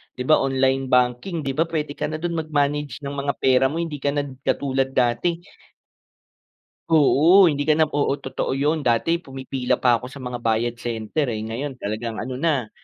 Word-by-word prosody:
di 125 - -4
ba 155 - +7
online 135 0 +1
banking, 125 +8 +1
di 135 - -1
ba 160 - +3
pwede 155 -3 -3
ka - - -6
na 155 - -4
do'n 175 +1 -2
mag-manage 145 -3 -1
ng 140 - -4
mga 140 0 -1
pera 130 0 +4
mo. - - -5
Hindi 165 -3 -3
ka 140 - +2
na 145 - +1 0.2
katulad 135 -1 0
dati. 125 +8 +1 1.5
Oo, 165 +4 +6
hindi 145 -1 -1
ka 155 - +4
na 155 0 +2
oo, 145 -2 +1
totoo 130 0 -3
yun. 145 +2 0
Dati, 125 +8 +2
pumipila 130 -4 -3
pa 120 -2 +4
ko 125 - -10
sa 135 +2 -10
mga 125 -1 -4
Bayad 115 +1 -1
Center 120 +5 -2
eh, 110 - -4
ngayon, 120 +6 -4
talagang 110 +2 -4
ano 130 +1 -5
na, 140 -7 0
135 Hz, 185 wpm, -22 LUFS, 125-150 Hz, 1.5 s, ba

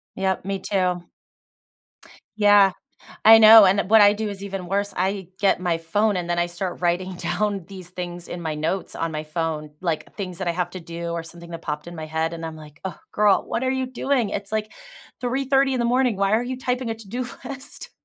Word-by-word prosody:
Yep, 190 -1 -1
me 195 0 -2
too. 180 -3 0 1.3
Yeah, 205 -2 +6 0.5
I 225 +1 +10
know, 220 0 +10
and, 195 +1 +4
eh, - - +2
what 220 +3 +6
I 205 0 +7
do 215 +1 -3
is 200 -1 -6
even 195 -2 -5
worse. 200 +2 -1
I 190 0 -1
get 195 -2 +3
my 175 -2 0
phone, 205 +6 +1
and 175 -1 -3
then 175 0 0
I 175 - +2
start 175 +1 -5
writing 180 +1 0
down 205 0 -1
these 185 -2 -10
things 175 -1 -6
in 175 - -6
my 160 -2 -2
notes 160 +5 -2
on 165 - -2
my 155 0 -4
phone, 155 -1 -3
like, 170 -4 -3
things 185 -4 -5
that 190 -2 -2
I - - +1
have 175 0 -2
to 185 - -7
do, 170 0 -6
or 170 0 -3
something 170 +1 -11
that 165 - -7
popped 150 +1 -4
in 175 0 -8
my 160 -1 -6
head, 160 +1 -1
and 165 0 -7
I'm 160 -1 -6
like, 155 0 -14
"Oh, 190 - -5
girl, 210 -1 +3
what 250 - -2
are 260 - +1
you 260 0 -1
doing? 255 -2 0
It's, 200 0 -5
like, 215 0 -2 0.5
03:30 270 +2 +1
in 255 - 0
the - - +1
morning. 250 -2 +2
Why 195 +1 +1
are 220 +2 +3
you 255 +1 -4
typing 250 -2 -2
a - - -1
to-do 225 +3 -5 0.2
list?" 275 -1 -8
190 Hz, 225 wpm, -23 LUFS, 170-215 Hz, 1.3 s, I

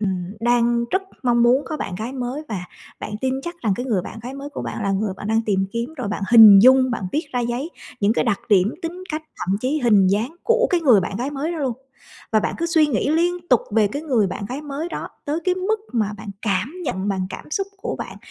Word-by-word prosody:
ừm, 190 -2 -2
đang 235 0 +2
rất 380 - +1 0.2
mong 240 -1 +3
muốn 250 +4 +4
có 310 - -4
bạn 195 - -4
gái 225 +7 -5
mới 255 +3 -4
và 190 -5 -4 0.4
bạn - - -6
tin 260 0 0
chắc 345 +3 -5
rằng 215 -4 +1
cái 245 - -4
người 205 -7 0
bạn - - -8
gái 255 +2 -6
mới 275 +1 -7
của - - -6
bạn - - -5
là 200 -1 0
người 195 0 -1
bạn 205 - -7
đang 225 +1 +2
tìm 195 -2 +1
kiếm. 235 +6 -3
Rồi 250 -7 -3
bạn 205 -1 -3
hình 220 -4 +10
dung, 260 0 +6
bạn 230 -5 -3
viết 305 +1 -1
ra 245 - 0
giấy 240 +6 -2 0.3
những 205 +1 +3
cái - - 0
đặc 220 -4 0
điểm 200 +1 +3
tính 345 +2 -5
cách 310 +1 -3
thậm 190 +2 -1
chí 275 +5 0
hình 210 -6 +4
dáng 220 - 0
của 485 +1 +3
cái 355 -2 +2
người 250 -11 +5
bạn 190 +2 -4
gái 250 +6 -2
mới 290 +4 -3
đó 335 - -4
luôn, 265 -5 0 0.6
và 215 - +4
bạn - - -2
cứ 335 - 0
suy 320 -3 +4
nghĩ 280 +1 0
liên 345 +2 0
tục 250 - +5
về 210 -1 +3
cái 285 +9 -5
người 250 -10 +2
bạn 190 - -5
gái 265 +4 -4
mới 295 +3 -4
đó - - -5 0.2
tới 300 +2 -2
cái 365 - +2
mức 405 +4 -1
mà 215 -4 0
bạn 215 -1 -7
cảm 210 - -1
nhận 195 -7 -2
bằng 190 -2 -1
cảm - - -9
xúc 390 +5 -1
của - - -4
bạn, - - -7
245 Hz, 260 wpm, -22 LUFS, 210-300 Hz, 0.6 s, hình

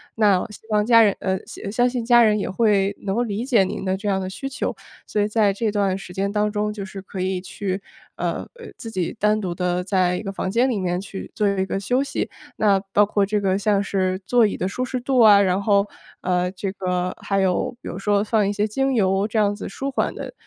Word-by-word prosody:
那 205 -4 +3
希 210 - -11
望 210 -1 +2
家 230 0 +7
人 205 -3 +4
呃， 190 -1 0
相 200 - -7
相 245 +3 +2
信 245 -2 -3
家 240 0 +6
人 215 -2 +4
也 200 - -2
会 200 -1 +2
能 195 -1 -2
够 240 - +1
理 220 0 -3
解 240 -7 +4
您 185 - -4
的 190 0 +1
这 205 +2 -5
样 190 -1 +1
的 185 - -4
需 270 +8 -6
求， 275 - -3 0.3
所 210 - -2
以 205 - +2
在 210 -2 +2
这 215 +2 -1
段 200 -2 +1
时 195 -2 -10
间 195 +2 -1
当 210 0 +1
中， 210 0 -1
就 205 -2 -6
是 195 0 -8
可 190 0 -8
以 185 0 -1
去 190 +1 -4 0.4
呃， - - -2
呃， 470 -2 -11
自 225 - -8
己 185 -5 -2
单 210 +1 +2
独 180 -3 -3
地 180 0 -1
在 185 -1 +1
一 - - -4
个 195 -2 -4
房 190 - -3
间 240 +5 +3
里 240 - 0
面 180 -1 -1
去 195 0 -8
做 210 - +1
一 190 -1 0
个 195 - -2
休 245 +7 +1
息。 280 - -3 0.3
那 200 -2 +3
包 205 - +5
括 205 -1 +1
这 205 +1 -1
个， 190 -1 +1
像 200 -1 +2
是 185 -1 -1
座 235 +2 +4
椅 - - -3
的 180 - -2
舒 250 +6 -3
适 255 0 -3
度 260 +1 +1
啊， 210 -3 +8
然 190 0 +1
后， 200 -1 +3 0.4
呃， 180 0 0
这 195 +1 -4
个 180 -1 -2
还 195 -1 0
有 190 +5 0
比 - - -9
如 175 - -6
说 205 0 +2
放 215 -1 +1
一 - - 0
些 205 0 0
精 270 +5 0
油 195 -1 +2
这 220 - -3
样 205 -1 +3
子 205 - -6
舒 275 +7 -4
缓 265 - -1
的， - - -7
200 Hz, 275 characters per minute, -22 LUFS, 190-215 Hz, 0.4 s, 啊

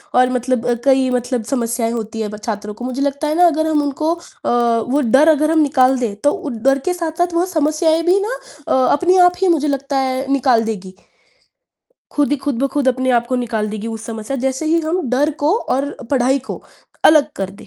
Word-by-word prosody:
और 250 0 +4
मतलब 250 -1 -1 0.2
कई 265 -1 +3
मतलब 245 -1 -1
समस्याएँ 235 -2 -1
होती 225 -1 -5
है, 215 - -2
ब 210 - -8
छात्रों 210 -2 -4
को। 245 +3 -8
मुझे 255 +2 -4
लगता 280 +2 -1
है 305 - -1
ना 355 - +6
अगर 315 -1 0
हम 305 -2 +2
उनको 310 +3 -1
अ, 340 - -8 0.7
वो 290 +3 +2
डर 300 +6 +6
अगर 305 +1 +3
हम 320 - +3
निकाल 265 -3 +3
दें, 225 -5 -2
तो 290 +8 +1
उ 295 - -5
डर 270 +1 +3
के 365 - +1
साथ-साथ 345 0 -2
वह 340 +2 +1
समस्याएँ 320 -1 +1
भी 365 +3 +4
ना 455 +5 -2 0.3
अ, - - +1 0.2
अपनी 360 +5 +2
आप 355 - 0
ही 385 - +3
मुझे 300 +1 -2
लगता 275 0 -2
है 265 +1 -2
निकाल 255 -4 +3
देगी। 190 -4 -5 1.2
खुद 290 -1 +1
ही 290 - +2
खुद 275 -3 -3
ब - - +3
खुद 285 -3 +1
अपने 260 0 0
आप 235 -1 +2
को 255 - -1
निकाल 225 -3 -2
देगी 215 +1 -6
उस 225 -1 -6
समस्या 225 +3 -5
जैसे 265 +4 -2
ही 330 +2 +2
हम 325 -1 -2
डर 280 +4 +2
को 305 - +3
और 275 - -2 0.2
पढ़ाई 265 0 +2
को - - -6 0.4
अलग 305 -2 +5
कर 195 -1 -3
दें। 195 - -15
270 Hz, 220 wpm, -18 LUFS, 240-310 Hz, 1.2 s, ना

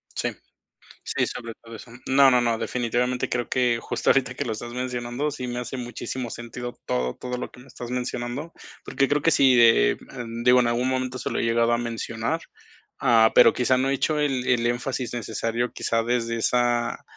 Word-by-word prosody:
Sí. - - -1 0.7
Sí, - - 0
sobre 115 -1 -6
todo 115 0 -10
eso. 115 +2 -12 0.2
No, 135 +1 +6
no, 125 -1 +4
no, 115 -1 +1
definitivamente 125 +1 -1
creo 120 -1 -2
que 120 -2 +1
justo - - -1
ahorita 130 -2 +1
que - - -3
lo 120 - -2
estás 120 +2 -7
mencionando, 125 +3 -3
sí 125 -2 -5
me 120 0 -4
hace 125 +2 -5
muchísimo 120 0 -5
sentido 120 +1 -7
todo, 65 0 -1
todo 125 0 -5
lo - - -5
que - - -15
me 135 - -17
estás 120 -2 -9
mencionando. 125 +4 -4 0.3
Porque 135 - +1
creo 145 +1 +1
que 165 - +4
sí, 135 -4 +5
de, 115 -1 +5
mm, 120 -2 -7
digo, 125 +1 +6
en 120 - +2
algún 120 +2 0
momento 130 0 -2
se 125 - -4
lo - - -1
he - - 0
llegado 115 0 +2
a - - +2
mencionar. 115 +5 -3 0.6
Ah, 115 -3 +5
pero, - - +7
quizá, 125 +1 +2
no 130 +1 +1
he - - +1
hecho 150 +2 0
el 135 -4 0
el 120 -2 +2
énfasis 120 0 -2
necesario, 115 0 -2
quizá, 115 0 0
desde 115 0 -1
esa 120 0 +1
120 Hz, 205 wpm, -24 LUFS, 115-130 Hz, 0.7 s, pero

